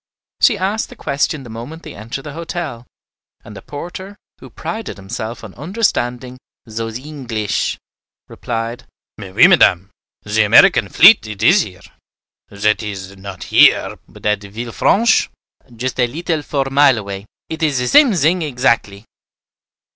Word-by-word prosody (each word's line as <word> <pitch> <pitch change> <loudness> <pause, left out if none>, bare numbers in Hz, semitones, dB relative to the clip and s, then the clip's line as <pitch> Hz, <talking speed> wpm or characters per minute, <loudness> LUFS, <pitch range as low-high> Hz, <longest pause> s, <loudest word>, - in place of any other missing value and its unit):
She 230 -6 +4
asked 200 +4 -2
the - - -12
question 140 +1 -2
the 120 - -11
moment 125 +9 -9
they - - -9
entered 115 +6 -7
the 150 - -8
hotel; 160 -7 -6 0.6
and - - -11
the - - -9
porter, 175 +7 -8 0.2
who - - -12
prided 220 - -6
himself 110 +4 -6
on 105 -4 -10
understanding 130 - -2 0.3
"zose 115 +1 -5
Eenglesh," 125 -7 -3 0.5
replied, 115 0 -5 0.3
"Mais 95 -3 -9
oui, - - +6
Madame, 90 +3 +4 0.4
ze 110 +1 +2
Americaine 105 0 +5
fleet 195 - +6
it 105 -2 -6
is 190 +4 +5
here; 90 - -8 0.7
zat 105 +2 0
is, 100 -2 -7
not 95 -1 -9
here, - - +4
but - - -16
at 105 -1 +1
Villefranche, 115 - +1 0.5
just 130 +3 -4
a 125 - +3
leetle 160 +4 -3
four 140 -2 -2
mile 140 -2 +5
away, 100 -1 -7 0.2
it 160 0 -6
is 155 -3 +1
ze 125 0 0
same 240 - +5
zing 170 +3 +2
exactly." 120 -8 -1
120 Hz, 145 wpm, -17 LUFS, 105-155 Hz, 0.7 s, oui